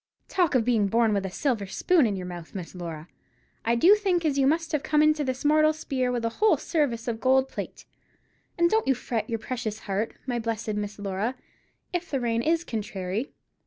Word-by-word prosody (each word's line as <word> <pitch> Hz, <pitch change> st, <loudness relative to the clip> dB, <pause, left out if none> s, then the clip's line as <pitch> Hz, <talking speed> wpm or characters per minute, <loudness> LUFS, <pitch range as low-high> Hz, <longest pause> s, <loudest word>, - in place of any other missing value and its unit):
Talk 350 Hz, -7 st, +1 dB
of 235 Hz, -3 st, +3 dB
being 225 Hz, -5 st, +3 dB
born 225 Hz, +1 st, +3 dB
with 195 Hz, -1 st, 0 dB
a -, -, -5 dB
silver 215 Hz, 0 st, -1 dB
spoon 305 Hz, -, +3 dB
in 205 Hz, -, -1 dB
your 185 Hz, -1 st, -5 dB
mouth, 175 Hz, -1 st, -8 dB
Miss 180 Hz, -3 st, -6 dB
Laura; 165 Hz, -3 st, -7 dB, 0.6 s
I 230 Hz, +1 st, +2 dB
do 340 Hz, +12 st, +7 dB
think 380 Hz, -5 st, +1 dB
as 295 Hz, -3 st, +2 dB
you 270 Hz, -, +4 dB
must 325 Hz, +2 st, +1 dB
have 300 Hz, -3 st, 0 dB
come 300 Hz, 0 st, +3 dB
into 305 Hz, -1 st, +3 dB
this 260 Hz, +1 st, -3 dB
mortal 310 Hz, +1 st, +5 dB
spear 260 Hz, -5 st, -2 dB
with 240 Hz, -2 st, -1 dB
a -, -, +2 dB
whole 430 Hz, +1 st, +5 dB
service 255 Hz, -8 st, -1 dB
of 225 Hz, -1 st, -2 dB
gold 265 Hz, +1 st, +4 dB
plate. -, -, -7 dB, 0.7 s
And 340 Hz, 0 st, +4 dB
don't 440 Hz, +5 st, +1 dB
you 270 Hz, -, +4 dB
fret 235 Hz, -1 st, -3 dB
your 230 Hz, -, 0 dB
precious 220 Hz, -2 st, -4 dB
heart, 205 Hz, +3 st, -2 dB
my 245 Hz, -2 st, -1 dB
blessed 225 Hz, -1 st, -2 dB
Miss 205 Hz, -1 st, -4 dB
Laura, 205 Hz, +5 st, -2 dB, 0.6 s
if 350 Hz, -1 st, -2 dB
the 275 Hz, -, -1 dB
rain 230 Hz, -1 st, 0 dB
is 325 Hz, +5 st, +1 dB
contrairy. 210 Hz, -, -3 dB
240 Hz, 210 wpm, -26 LUFS, 210-300 Hz, 0.7 s, do